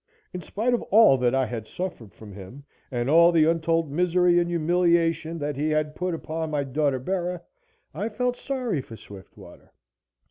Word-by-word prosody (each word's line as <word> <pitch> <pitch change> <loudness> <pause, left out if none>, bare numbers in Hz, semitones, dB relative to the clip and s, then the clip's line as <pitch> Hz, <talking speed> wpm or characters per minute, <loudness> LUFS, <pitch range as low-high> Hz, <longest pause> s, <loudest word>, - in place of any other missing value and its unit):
In 180 - -5
spite 220 +9 -2
of 240 - 0
all 215 -9 +6
that 125 +1 +1
I 135 -1 +2
had 115 -2 -6
suffered 175 - -6
from 100 +3 -13
him, 100 +8 -11 0.3
and 120 -2 -2
all 170 +4 +6
the 160 -2 +4
untold 165 -1 0
misery 175 +2 +2
and 175 0 -1
humiliation 170 -1 +1
that 145 -2 -3
he 150 +3 -1
had 155 0 0
put 180 +1 -3
upon 160 0 -5
my 150 -2 -1
daughter 140 0 0
Bera, 180 +5 -3 0.5
I 215 - -3
felt 250 +3 -1
sorry 250 - -3
for 115 - -12
Swiftwater. 100 -2 -15
165 Hz, 175 wpm, -25 LUFS, 140-180 Hz, 0.5 s, all